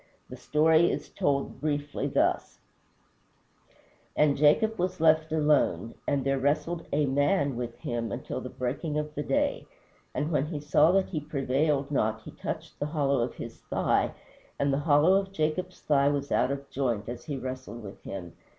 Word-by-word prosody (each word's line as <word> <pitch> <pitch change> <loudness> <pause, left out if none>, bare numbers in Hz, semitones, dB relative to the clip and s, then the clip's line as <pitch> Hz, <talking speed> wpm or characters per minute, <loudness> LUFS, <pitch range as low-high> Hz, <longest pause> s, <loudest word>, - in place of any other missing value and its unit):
The - - -6
story 160 +3 +3
is - - -3
told 140 -1 -1
briefly 145 -1 -1
thus: - - 0 1.6
"And 150 -2 +4
Jacob 165 +10 +3
was 180 0 -1
left 160 0 +4
alone. 150 - +2
And 140 -2 +1
there 135 0 +1
wrestled 160 +5 0
A 150 +1 +2
MAN 140 +1 +1
with 120 -1 -4
him 115 -3 -3
until - - -4
the - - -6
breaking 145 +5 -3
of 150 0 -3
day. 285 - -1 0.5
And 150 +2 -1
when 150 -2 +1
he 155 -2 -4
saw 150 +2 +4
that 195 -1 +2
he 160 - -2
prevailed 140 0 0
not 110 -5 0
he - - -9
touched - - -6
the 145 - -1
hollow 140 -3 +1
of 120 - -2
his - - -8
thigh, - - 0 0.4
and 140 0 +1
the 135 - +1
hollow 150 +4 +4
of 195 -1 -10
Jacob's 175 +2 -2
thigh 140 -2 +3
was 140 -1 -2
out 125 - +2
of 140 0 -4
joint 120 -6 -1
as 120 0 -7
he 145 -3 -3
wrestled 130 -2 -6
with 100 -1 -10
him. 90 -4 -7
145 Hz, 170 wpm, -28 LUFS, 135-155 Hz, 1.6 s, And